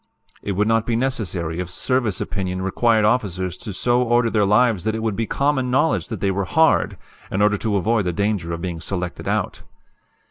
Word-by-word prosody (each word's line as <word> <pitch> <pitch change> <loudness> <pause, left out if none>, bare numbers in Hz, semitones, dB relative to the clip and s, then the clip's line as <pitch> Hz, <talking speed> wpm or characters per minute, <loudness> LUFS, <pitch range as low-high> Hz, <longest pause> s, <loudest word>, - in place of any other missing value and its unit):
"It 100 - -3
would 105 +3 +1
not 115 0 +1
be 120 - +1
necessary 95 -10 -1
if 90 -1 -4
service 115 +3 0
opinion 95 -1 -3
required 110 +3 +2
officers 95 -6 0 0.2
so 120 0 +2
to 120 - -4
order 120 -1 +3
their 105 -3 +2
lives 110 -2 +3
that 110 +1 -1
it 110 - -4
would 110 -3 -1
be 115 +1 -2
common 140 -2 0
knowledge 150 +6 +1
that 110 -6 -6
they 100 - +1
were 95 +1 -1
'hard,' 160 - +2 0.3
in 95 - -1
order 105 0 +3
to 110 -3 -1
avoid 105 +2 +1
the 90 - 0
danger 100 -2 -1
of 85 0 -4
being 85 -3 -4
selected 90 0 -4
out. - - -1
105 Hz, 205 wpm, -21 LUFS, 95-120 Hz, 0.3 s, order